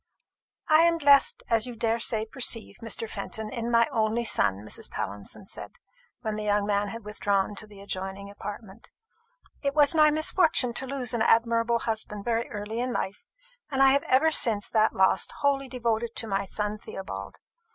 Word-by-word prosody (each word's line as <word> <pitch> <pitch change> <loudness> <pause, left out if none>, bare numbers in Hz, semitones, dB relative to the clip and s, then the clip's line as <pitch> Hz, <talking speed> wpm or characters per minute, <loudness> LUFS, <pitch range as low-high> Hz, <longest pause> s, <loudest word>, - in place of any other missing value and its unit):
"I 310 -1 +6
am 335 0 +3
blessed, 330 +11 +4
as 230 +1 +1
I 245 - -6
daresay 225 -1 0
you - - -3
perceive, 230 -2 0
Mr. 225 0 -3
Fenton, 220 0 -5
in 235 -2 -3
my 230 -1 +4
only 225 -1 0
son," 105 - +3
Mrs. - - -3
Pallinson 100 - -6
said, - - -6 0.5
when 220 -3 -3
the 215 - -4
young 205 -1 +1
man 205 0 0
had 225 +1 -8
withdrawn 205 -1 0
to 215 - -5
the 205 -2 -14
adjoining 195 0 -5
apartment. 205 +1 -9 0.7
"It 280 0 -1
was 295 -1 +4
my 305 -1 +6
misfortune 310 -3 +2
to 265 +3 -3
lose 255 -3 -3
an 235 - -1
admirable 230 +1 +3
husband 215 -3 -4
very 235 0 -1
early 210 +1 -5
in 250 +1 -1
life; 200 -3 -4 0.4
and 270 -2 +2
I 270 - +7
have 280 +1 +3
been - - -13
ever 275 +5 +4
since 225 -7 +4
that 220 -1 +2
loss 190 0 +3
wholly 275 -1 0
devoted 235 -2 -2
to - - -2
my 195 -1 -1
son 210 +2 -3
Theobald. 100 - -7
225 Hz, 185 wpm, -27 LUFS, 205-255 Hz, 0.7 s, I